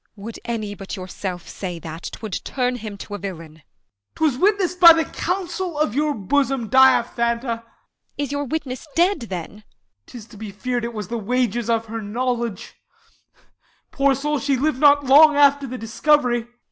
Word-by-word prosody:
Bea. 200 - -15
Would 230 +1 -7
any 215 -4 -3
but 195 0 -7
yourself 185 -1 -6
say 180 -3 -6
that, 165 0 -8
'Twould 215 -4 -6
turn 250 -1 -1
him 215 -3 -7
to 205 - -9
a 205 - -4
villain. 165 -5 -8
Als. 155 - -24 0.7
'Twas 250 - -7
witness'd 380 -2 +1
55 - - -28
By 340 -1 +11
the - - -12
counsel 360 -2 -3
of 300 -8 0
your 295 +2 0
bosom, 265 +2 0
Diaphanta. 235 -2 +3 0.6
Bea. 290 - -1
Is 280 - -4
your 285 0 -2
witness 285 -1 -4
dead 360 +4 +3
then? 175 -3 -5
Als. 215 - -18 0.4
'Tis 235 -4 -10
to 220 - -15
be 215 0 -7
fear'd 245 +4 -3
It 235 -1 -6
was 210 -3 -5
the 235 0 -3
wages 240 +1 -1
of 225 -1 +1
her 225 0 -5
knowledge; 235 -1 -3 1.2
poor 275 -1 +2
soul, 295 +2 -1
She 280 -1 0
liv'd 285 0 0
not 285 -1 +5
long 295 +3 +7
after 285 -1 +4
the 255 +1 -6
discovery. 240 +1 +1
245 Hz, 185 wpm, -22 LUFS, 215-285 Hz, 1.2 s, By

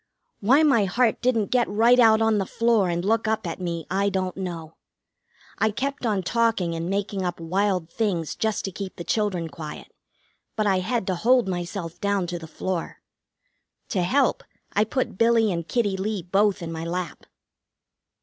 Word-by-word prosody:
Why 265 +9 +4
my 270 -9 +4
heart 225 +5 +1
didn't 230 -5 +1
get 245 -2 +2
right 230 +5 +4
out 225 -2 +6
on 220 -2 +3
the 195 - -2
floor 230 -5 +2
and 175 +1 -2
look 225 +2 +1
up 220 -1 0
at 170 +2 -5
me. 170 -3 -3
I 200 +2 +2
don't 185 -2 -2
know. 170 -4 -6 0.8
I 220 - +3
kept 265 +3 -3
on 200 -4 0
talking 225 -4 +1
and 165 +1 -3
making 195 0 -2
up 175 -1 -3
wild 185 +1 0
things 180 -8 -1
just 220 -1 -1
to 195 - -3
keep 195 0 -6
the 170 - -6
children 190 -5 -1
quiet, 150 0 -9 0.6
but 215 - 0
I 190 -2 +3
had 225 +3 -1
to 185 - 0
hold 235 +5 +3
myself 175 -1 -4
down 200 -2 +1
to 175 0 -4
the 160 - -9
floor. 180 +1 -4 0.9
To 190 - 0
help, 255 +9 +2 0.3
I 210 +1 +3
put 235 -4 -2
Billy 230 -2 +4
and 170 -2 -3
Kitty 210 -5 0
Lee 195 0 -2
both 195 +1 +1
in 165 - -5
my 160 0 -5
lap. 175 +1 -5
195 Hz, 180 wpm, -24 LUFS, 175-225 Hz, 0.9 s, out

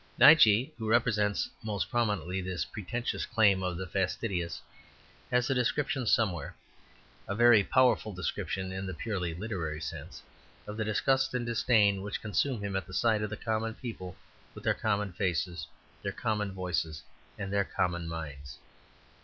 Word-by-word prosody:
Nietzsche, 125 -6 +7
who 110 -1 -3
represents 110 -3 +2
most 105 -7 -3
prominently 100 -6 0
this 90 -3 -3
pretentious 120 +4 -3
claim 105 -4 +4
of 90 -2 -2
the 95 - -4
fastidious, 90 -2 -2 0.7
has 125 0 +2
a 135 - +2
description 130 0 0
somewhere 100 -8 +1 0.7
a 100 - -2
very 120 -2 +6
powerful 125 -2 +3
description 95 0 -3
in 95 +1 -4
the 95 - -5
purely 90 -3 -3
literary 85 -6 -3
sense 80 - -7 0.4
of 105 - -6
the 110 - -1
disgust 130 +5 +1
and 120 -1 -1
disdain 110 -4 +3
which 100 +1 -4
consume 110 +1 -1
him 100 -1 -3
at 95 - -2
the 90 - -8
sight 110 -3 +2
of 105 - -2
the 105 - -5
common 110 0 -2
people 100 -8 -7 0.4
with - - -10
their - - +3
common 100 -3 -1
faces, 85 -1 -1 0.3
their 100 - -2
common 105 -1 -1
voices, 90 -4 -2 0.3
and 100 -1 -4
their 100 0 +3
common 85 -3 -1
minds. 75 -4 -7
100 Hz, 155 wpm, -30 LUFS, 90-115 Hz, 0.7 s, Nietzsche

